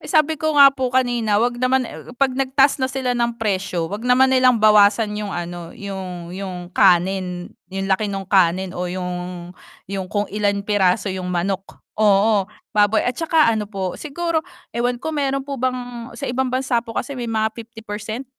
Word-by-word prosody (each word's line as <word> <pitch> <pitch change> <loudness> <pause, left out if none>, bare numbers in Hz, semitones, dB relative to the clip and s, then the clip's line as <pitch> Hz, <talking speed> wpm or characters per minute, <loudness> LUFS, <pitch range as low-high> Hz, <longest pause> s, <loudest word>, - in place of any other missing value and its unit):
eh, - - -11
sabi 310 -2 +2
ko 310 -1 0
nga 275 -1 +9
po 260 -2 -1
kanina, 240 -5 +2
'wag 240 +3 +1
naman, 255 0 +2
eh - - -10
oh, 245 - -10
'pag 270 0 +2
nagtaas 270 +1 +2
na 260 - +1
sila 260 -1 -1
ng 235 -1 -1
presyo, 190 -6 -2
'wag 215 +4 -5
naman 260 +1 +5
nilang 255 -2 +5
bawasan 210 0 +5
'yung 210 -1 -4
ano, 175 -1 -6
'yung 185 -3 -6
'yung 180 -2 -6
kanin, 180 -1 +2 0.2
'yung 195 +1 -4
laki 205 +2 +1
nung 195 -1 -4
kanin 185 -1 +2
o 180 - -2
yung 180 -1 -5 0.4
yung 190 -2 -3
kung 205 +1 0
ilang 200 -1 0
piraso 200 -1 +2
'yung 185 -1 -4
manok. 185 +2 -3 0.2
Oo, 205 -1 +4 0.2
baboy 210 +1 +3
at 245 - +1
tsaka 315 -3 +3
ano 210 -2 -2
po 190 -3 -3
siguro 325 +2 -1 0.3
ewan 245 +1 0
ko 315 +6 -5
meron 275 -2 -1
po 275 -2 -5
bang 245 -2 -3
sa - - -6
ibang 260 +1 -1
bansa 255 -1 0
po 230 -1 -10
kasi 280 - -2
may 245 -3 -5
mga 220 -1 0
50% 225 +1 -7
215 Hz, 185 wpm, -21 LUFS, 190-255 Hz, 0.4 s, nga